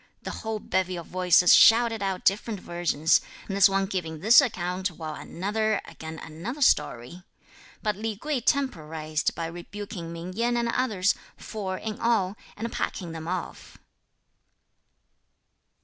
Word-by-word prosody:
the - - -4
whole 220 -1 -2
bevy 185 -2 -1
of 170 -1 -6
voices 180 -1 +5
shouted 230 -1 +6
out 190 -2 -2
different 205 +1 +1
versions; 170 -3 +1 0.3
this 195 -1 +5
one 195 0 +1
giving 175 -5 -4
this 220 - +7
account, 185 -6 -2
while 160 -3 -7
another 215 +6 -1
again 160 0 -9
another 170 - -7
story. 150 - +1 0.6
But 210 -2 0
Li 215 +1 -4
Kuei 295 +2 -2
temporised 160 - -1
by 165 - -3
rebuking 175 +1 -7
Ming 170 +2 -7
Yen 240 +4 0
and 235 0 0
others, 215 -6 +1 0.2
four 190 -3 -5
in 215 0 -5
all, 215 -5 +1 0.2
and 230 +2 -4
packing 175 -4 -3
them 160 0 -7
off. 180 0 -5
190 Hz, 135 wpm, -26 LUFS, 170-220 Hz, 0.6 s, this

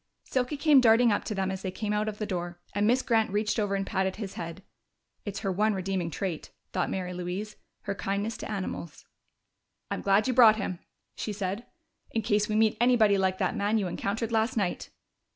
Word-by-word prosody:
Silky 260 +3 -1
came 290 -2 +6
darting 235 0 +5
up 205 - 0
to 215 - -3
them 190 -1 -1
as 190 0 -5
they 190 - -3
came 210 +2 -3
out 210 +1 0
of 210 - -7
the 215 - -2
door, 175 -3 -4
and 205 +1 +2
Miss 250 +3 +3
Grant 225 -2 +2
reached 210 +3 0
over 205 -2 0
and 195 0 -1
patted 190 -1 -1
his 205 -3 -6
head. 170 +3 -7 0.6
("It's 205 -2 -4
her 195 - -1
one 210 +3 +2
redeeming 185 -2 -2
trait," 170 0 -4 0.2
thought 185 - 0
Mary 180 -1 -3
Louise 180 +4 -4 0.3
"her - - -2
kindness 200 +3 -2
to - - -7
animals.") 185 -6 -5 0.9
"I'm - - -2
glad 200 +4 +3
you 255 - +1
brought 230 -3 +8
him," 190 -4 -3 0.4
she 215 - -3
said, 200 +3 -4 0.4
"in 225 - -2
case 210 0 +1
we 215 - 0
meet 220 0 +3
anybody 225 -5 +5
like 190 -1 +1
that 185 -2 0
man 205 +2 +1
you 205 - 0
encountered 205 +5 -2
last 225 +1 +1
night!" 190 -4 -1
205 Hz, 205 wpm, -28 LUFS, 190-220 Hz, 0.9 s, brought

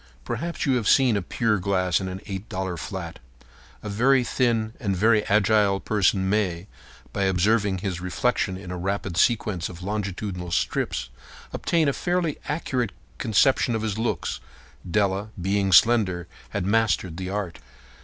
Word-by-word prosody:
Perhaps 170 0 -3
you 135 -3 +3
have 110 -4 -2
seen 130 -5 +5
a 100 - 0
pier 105 +3 0
glass 90 -2 +1
in 95 - -3
an 95 +1 -6
$8 95 -3 -5
flat. 85 +1 -6 0.6
A - - -5
very 125 +6 +3
thin 115 -3 0
and 100 -4 -1
very 110 +2 +4
agile 105 -1 +3
person 95 -2 +1
may, 95 -4 0 0.5
by 100 - 0
observing 100 +1 +2
his 90 -2 -4
reflection 95 +1 0
in 90 -2 -8
a 90 - -4
rapid 95 0 -2
sequence 105 -3 +1
of 90 0 -10
longitudinal 100 -2 -3
strips, 65 -6 -1 0.4
obtain 165 -3 +1
a 140 - +2
fairly 175 -2 -1
accurate 130 -7 -1 0.3
conception 120 +1 +3
of 110 - -2
his 110 -1 -2
looks. 115 - -2 0.5
Della, 100 +1 +1
being 95 +2 0
slender, 95 -4 +4 0.2
had 100 -3 -3
mastered 100 -5 +1
the 95 0 -4
art. 100 -3 -4
100 Hz, 150 wpm, -25 LUFS, 95-115 Hz, 0.6 s, seen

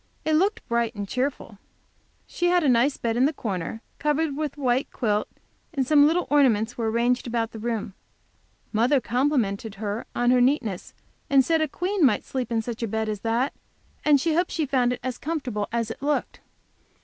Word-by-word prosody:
It 315 - +1
looked 385 +7 +1
bright 235 -1 0
and 205 -1 -4
cheerful. 250 -4 -3 0.7
She 350 - -1
had 355 -1 +3
a - - +2
nice 250 +3 +3
bed 230 0 -1
in 255 - +4
the 295 - +2
corner, 210 - -4 0.2
covered 300 0 0
with 300 -1 -3
a - - -9
white 255 +1 +1
quilt, 210 -4 0 0.5
and 270 -2 +1
some 290 +1 +6
little 340 +3 +1
ornaments 245 -6 +3
were 225 -2 -1
arranged 240 +3 +1
about 230 -1 -1
the 220 - -8
room. 225 -2 -3 0.8
Mother 245 +6 +3
complimented 235 -5 0
her 210 +2 -4
on 245 0 +3
her 250 -1 +4
neatness, 245 -8 0 0.3
and 270 -2 +5
said 325 -1 +2
a 315 - +2
queen 365 +5 -1
might 265 - +4
sleep 250 -3 -4
in 225 -1 0
such 235 0 -6
a 230 - -1
bed 220 +1 -2
as 210 -2 -3
that, 230 +5 0 0.5
and 295 -2 +5
hoped 335 +4 +1
she 315 - -1
found 255 -3 +2
it 250 - -3
as 255 -1 -4
comfortable 265 -10 -3
as 230 -1 -1
it - - -9
looked. 290 +1 -1
245 Hz, 195 wpm, -25 LUFS, 225-290 Hz, 0.8 s, some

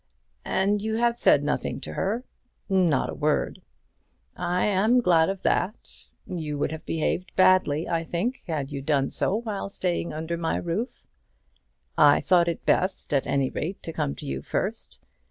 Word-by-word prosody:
"And 200 +2 +1
you 220 +1 -1
have 235 +1 +1
said 145 - +5
nothing 150 - -2
to 80 - -7
her?" 215 - -1 0.4
"Not 180 -8 +2
a - - -6
word." 150 +1 0 0.7
"I 180 +1 0
am 210 +5 +3
glad 170 -7 +4
of 195 -1 -4
that. 190 +6 -2 0.2
You 155 -5 -4
would 145 - -1
have 160 0 -8
behaved 165 +3 -2
badly, 185 -5 +4
I 165 -1 0
think, 190 +11 -2
had 150 -4 -3
you 140 -1 -4
done 140 -1 +1
so 195 - 0
while 215 -3 -3
staying 175 -3 -2
under 160 +2 -3
my 165 -1 -1
roof." 190 +9 -3 0.9
"I 145 -2 +7
thought 175 -2 +3
it 170 - -3
best, 185 -4 +1
at 140 - +1
any 135 -2 +1
rate, 185 +5 -4
to 165 - -5
come 70 - -2
to - - -9
you 65 0 -3
first. - - -4
170 Hz, 170 wpm, -26 LUFS, 150-195 Hz, 0.9 s, I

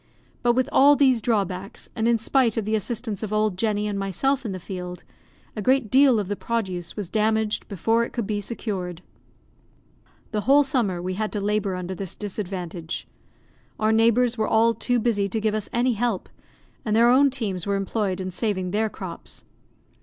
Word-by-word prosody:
But 240 0 +3
with 255 +1 +1
all 285 +2 +6
these 260 -5 +3
drawbacks, 195 -4 -2
and 225 -1 0
in 235 0 +4
spite 230 0 +2
of 220 - -1
the 215 - -1
assistance 220 -1 -2
of 215 -2 -4
old 215 -2 +1
Jenny 210 +1 0
and 205 -1 -2
myself 255 +8 0
in - - -3
the 185 - -5
field, 180 -1 -7 0.5
a 215 - -3
great 255 0 +2
deal 265 -3 +5
of 200 - -3
the 205 - -2
produce 190 -7 -3
was 205 -4 -3
damaged 220 +2 0
before 225 +4 +1
it - - -5
could 235 -4 -3
be 205 0 -2
secured. 185 -6 -5 1.3
The 210 -1 -1
whole 280 +5 +5
summer 220 -10 +1
we 185 +1 -2
had 215 +3 -2
to 210 - -1
labour 205 -1 0
under 180 +1 -4
this 190 -1 -6
disadvantage. 180 -5 -5 0.7
Our 215 0 +2
neighbours 230 +2 +3
were 220 - +1
all 230 +1 +4
too 245 +1 0
busy 210 -4 +1
to 220 - -1
give 215 0 0
us 215 -2 -3
any 245 +1 +2
help, 225 -3 -2 0.5
and 215 -1 0
their 235 +1 +5
own 280 +3 +5
teams 205 -9 -3
were 200 - +1
employed 195 -1 -1
in 185 0 -4
saving 185 -2 -2
their 215 +2 +1
crops. 185 -4 -8
215 Hz, 190 wpm, -24 LUFS, 195-235 Hz, 1.3 s, all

